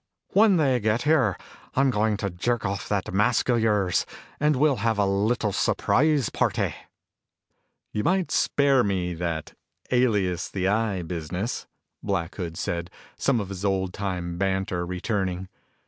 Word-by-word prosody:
When 205 -2 +5
they 135 -5 +3
get 110 +2 +1
here, 135 - +3 0.4
I'm 135 0 +3
going 105 -1 +1
to 100 -1 -3
jerk 115 +6 -1
off 100 0 -3
that 100 -3 -1
mask 105 +6 +2
of 120 -1 +3
yours 105 -5 +1 0.3
and 150 0 +3
we'll 150 +3 +4
all 135 - -1
have 110 +1 0
a 100 - +3
little 105 +3 +1
surprise 145 +5 +2
party." - - 0 1.2
"You 105 - -2
might 185 0 +1
spare 140 -3 +3
me 90 -3 -1
that 85 -2 -4 0.4
'alias, 105 -9 +1
the 95 -1 -1
Eye' 105 -3 0
business," 90 +5 -4 0.3
Black 95 -4 -2
Hood 85 -4 -5
said, 85 0 -3 0.3
some 135 -4 +1
of 100 -3 -4
his 100 -1 -6
old 95 -2 0
time 90 -3 -3
banter 95 -2 -1
returning. 95 0 -2
100 Hz, 150 wpm, -25 LUFS, 90-120 Hz, 1.2 s, When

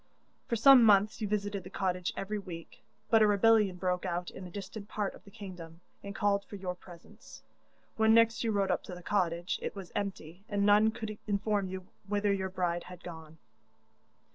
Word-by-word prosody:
'For 235 - 0
some 255 +2 +8
months 210 0 +4
you 210 - -1
visited 205 -1 -2
the 185 - -10
cottage 185 -2 -1
every 210 +2 -3
week; 170 -4 -10 0.3
but 225 -1 +6
a 215 - +6
rebellion 210 -1 +4
broke 180 0 -1
out 175 -1 -3
in 185 - -9
a - - -11
distant 200 +2 -8
part 205 -2 -2
of - - -15
the - - -13
kingdom, 180 -6 -10 0.2
and 200 0 -8
called 200 -1 +1
for 205 - -10
your 185 -2 -4
presence. 180 -1 -15 0.5
When 220 0 +4
next 230 +1 +4
you 225 - +1
rode 200 -2 +1
up 180 - 0
to 180 - -7
the 180 - -11
cottage, 175 -3 0
it - - -4
was 190 -3 -8
empty, 190 -3 -5
and 200 -1 +1
none 210 +2 +6
could 220 -1 -6
inform 205 -1 0
you 185 0 -6 0.2
whither 205 0 +1
your 190 -1 -2
bride 175 -2 -2
had 180 -1 -11
gone. 160 -2 -10
200 Hz, 195 wpm, -31 LUFS, 180-210 Hz, 0.5 s, some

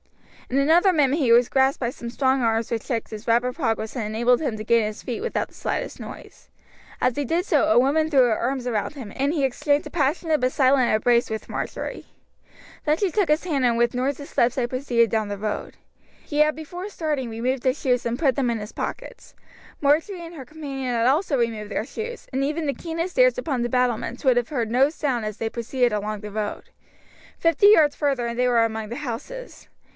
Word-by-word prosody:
In 260 - 0
another 330 +7 +5
minute 295 -2 +2
he 255 -6 +2
was 240 +1 +6
grasped 265 0 +2
by 240 -2 -1
some 240 -3 -8
strong 265 +2 +1
arms 225 -1 0
which 225 -2 -2
checked 230 -3 -3
his 215 +1 -8
rapid 240 +2 +2
progress 225 -6 -2
and 240 - -2
enabled 235 +4 +2
him 245 -8 -2
to 215 - -5
gain 235 0 +4
his 210 0 -5
feet 245 - -4
without 475 - -2
the - - -25
slightest - - -3
noise. - - -11 0.5
As 255 - +1
he 290 - -1
did 335 +7 0
so 310 -8 +3
a 220 +3 +5
woman 305 +5 +2
threw 275 -4 +5
her 230 -3 +2
arms 255 +1 -2
round 225 +4 -2
him, 235 -8 -8
and 275 +2 +1
he 290 -5 +1
exchanged 285 +3 0
a - - -12
passionate 310 0 0
but 255 0 +2
silent 260 -2 +3
embrace 235 +2 +2
with 220 0 -5
Marjory. - - -5 0.8
Then 305 0 +2
she 390 -1 0
took 400 -3 +1
his 300 +3 +2
hand 290 -7 0
and 235 -2 +3
with 235 0 +2
noiseless 275 +3 -2
steps 240 +1 +2
they 250 -2 0
proceeded 240 -3 +1
down 220 -1 -1
the 205 - -4
road. 210 +1 -4 0.5
He 295 - -3
had 305 0 +4
before 350 +5 -7
starting 300 - -2
removed 245 +3 -2
his 260 +2 +1
shoes 250 -2 0
and 235 +2 -2
put 275 -6 +2
them 260 -3 0
in 230 -1 -1
his 210 +1 -8
pockets. - - -6 0.4
Marjory 330 +5 +1
and 335 +1 -10
her 275 - -7
companion 275 -3 -5
had 230 +1 +2
also 290 +2 +2
removed 220 -3 -2
their 215 - -2
shoes, 465 - -7
and 265 +1 0
even 305 +3 -1
the 280 - 0
keenest 335 - -4
ears - - +5
upon 285 - -2
the 240 - -1
battlements 250 +1 -1
would 255 -2 +5
have 240 -1 0
heard 240 -7 -2
no 260 +4 +4
sound 275 -7 -2
as 215 -1 -5
they 225 - -2
proceeded 240 +1 0
along 210 0 -2
the 210 0 -8
road. 210 0 -4 0.7
Fifty 330 +4 +4
yards 310 -9 +6
farther 275 -5 0
and 235 0 -4
they 250 - +3
were 230 -2 +4
among 220 -1 -4
the 240 - -5
houses. 300 - -7
255 Hz, 220 wpm, -24 LUFS, 235-300 Hz, 0.8 s, was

